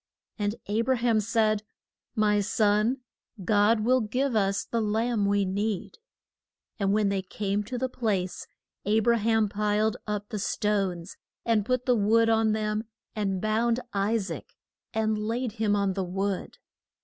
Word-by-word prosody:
And 205 Hz, +1 st, 0 dB
A 210 Hz, +3 st, 0 dB
bra 260 Hz, +2 st, +2 dB
ham 230 Hz, -2 st, +2 dB
said, 215 Hz, -1 st, +1 dB, 0.5 s
My 210 Hz, -1 st, +3 dB
son, 215 Hz, +4 st, +2 dB, 0.4 s
God 210 Hz, +2 st, +4 dB
will 255 Hz, +3 st, +3 dB
give 250 Hz, +4 st, -1 dB
us 200 Hz, -1 st, +1 dB
the 230 Hz, -, -1 dB
lamb 220 Hz, 0 st, +1 dB
we 200 Hz, 0 st, +2 dB
need. 200 Hz, -, -2 dB, 0.8 s
And 195 Hz, -1 st, +1 dB
when 210 Hz, -1 st, +2 dB
they 195 Hz, -1 st, 0 dB
came 200 Hz, +2 st, -2 dB
to 250 Hz, +3 st, -4 dB
the 260 Hz, +2 st, 0 dB
place, 210 Hz, -8 st, -2 dB, 0.4 s
A 215 Hz, +2 st, +3 dB
bra 235 Hz, +1 st, +3 dB
ham 225 Hz, 0 st, +2 dB
piled 210 Hz, +1 st, 0 dB
up 210 Hz, -1 st, -3 dB
the 215 Hz, -3 st, -3 dB
stones 195 Hz, -4 st, -1 dB, 0.3 s
and 220 Hz, -3 st, +2 dB
put 255 Hz, -1 st, 0 dB
the 250 Hz, -, +4 dB
wood 225 Hz, +2 st, +3 dB
on 220 Hz, -1 st, +3 dB
them, 215 Hz, 0 st, -1 dB, 0.3 s
and 195 Hz, -3 st, -1 dB
bound 225 Hz, +3 st, +1 dB
I 200 Hz, +3 st, +1 dB
saac 190 Hz, -8 st, -5 dB, 0.5 s
and 220 Hz, -1 st, 0 dB
laid 230 Hz, +3 st, -2 dB
him 215 Hz, -1 st, 0 dB
on 200 Hz, -1 st, +1 dB
the 190 Hz, 0 st, -2 dB
wood. 195 Hz, +1 st, -3 dB
215 Hz, 160 wpm, -27 LUFS, 205-225 Hz, 0.8 s, God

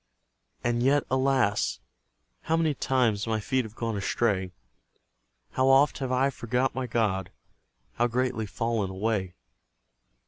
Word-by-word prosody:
And 120 Hz, 0 st, 0 dB
yet, 140 Hz, +3 st, +3 dB
alas! 130 Hz, -5 st, +1 dB, 0.7 s
how 165 Hz, -, +2 dB
many 160 Hz, -2 st, +2 dB
times 120 Hz, -6 st, +1 dB
My 110 Hz, -1 st, 0 dB
feet 130 Hz, +4 st, 0 dB
have 110 Hz, 0 st, -11 dB
gone 115 Hz, -2 st, -3 dB
astray! 100 Hz, -2 st, 0 dB, 1.0 s
How 130 Hz, 0 st, +1 dB
oft 135 Hz, +2 st, +4 dB
have 130 Hz, -2 st, -3 dB
I 130 Hz, +2 st, +2 dB
forgot 125 Hz, +1 st, -1 dB
my 130 Hz, 0 st, -3 dB
God! 105 Hz, -6 st, 0 dB, 0.6 s
How 120 Hz, -, +1 dB
greatly 125 Hz, -2 st, -1 dB
fallen 115 Hz, -1 st, -1 dB
away! 95 Hz, -1 st, -2 dB
120 Hz, 130 wpm, -27 LUFS, 110-130 Hz, 1.0 s, oft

